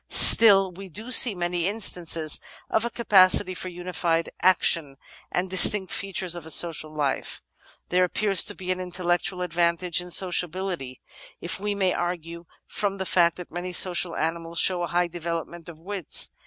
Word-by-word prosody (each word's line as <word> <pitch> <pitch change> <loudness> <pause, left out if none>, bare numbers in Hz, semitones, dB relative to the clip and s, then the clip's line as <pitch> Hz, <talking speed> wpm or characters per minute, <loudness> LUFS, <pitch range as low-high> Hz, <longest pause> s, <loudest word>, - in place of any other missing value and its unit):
Still, 195 -4 +6
we 190 +2 -12
do 220 +9 -8
see 240 -4 +7
many 175 0 -2
instances 170 -7 0 0.3
of 220 +1 +1
a - - -3
capacity 185 -5 +3
for 185 0 -6
unified 175 -2 -3
action 165 -6 +1 0.3
and 180 +1 -2
distinct 190 +1 +5
features 190 -3 -3
of 175 -2 -7
a 160 - -12
social 160 -2 +3
life. 145 -3 -4 0.5
"There 180 +1 +1
appears 195 +2 +3
to 205 - -3
be 185 -1 -6
an 185 - -3
intel 180 0 -7
lectual 175 +1 -1
advantage 170 +1 -1
in 180 - -11
sociability, 180 -6 -2 0.4
if 170 +2 -4
we 205 +1 -4
may 190 -2 -1
argue 170 -1 -6 0.2
from 200 -1 -4
the 190 - -5
fact 170 -2 +1
that 180 - -11
many 180 +1 -7
social 175 -1 +2
animals 165 +1 -5
show 180 0 +2
a 175 - -3
high 175 +1 -1
development 170 0 -7
of 160 -2 -13
wits. 185 -1 -1
180 Hz, 170 wpm, -23 LUFS, 170-190 Hz, 0.5 s, see